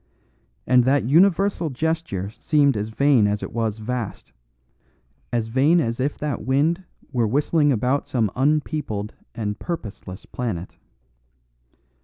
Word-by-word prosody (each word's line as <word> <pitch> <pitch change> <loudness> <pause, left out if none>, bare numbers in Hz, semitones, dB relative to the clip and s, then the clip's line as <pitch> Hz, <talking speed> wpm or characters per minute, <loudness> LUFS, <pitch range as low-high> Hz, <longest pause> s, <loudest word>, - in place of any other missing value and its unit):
And 125 -1 +5
that 140 +1 +3
universal 175 - +3
gesture 150 - -2
seemed 140 +2 +2
as 105 +1 -2
vain 130 -2 +3
as 105 0 -1
it - - -6
was 110 -2 -1
vast, 115 0 -5 1.0
as 115 -2 -1
vain 140 +8 +4
as 115 -5 -1
if 140 +3 -1
that 145 -4 -3
wind 150 - +1 0.3
were 120 -3 +2
whistling 145 +4 +2
about 130 +4 0
some 110 -6 0
unpeopled 140 -6 -1 0.2
and 105 -2 -3
purposeless 105 - -6
planet. 100 -8 -5
130 Hz, 125 wpm, -23 LUFS, 110-150 Hz, 1.0 s, And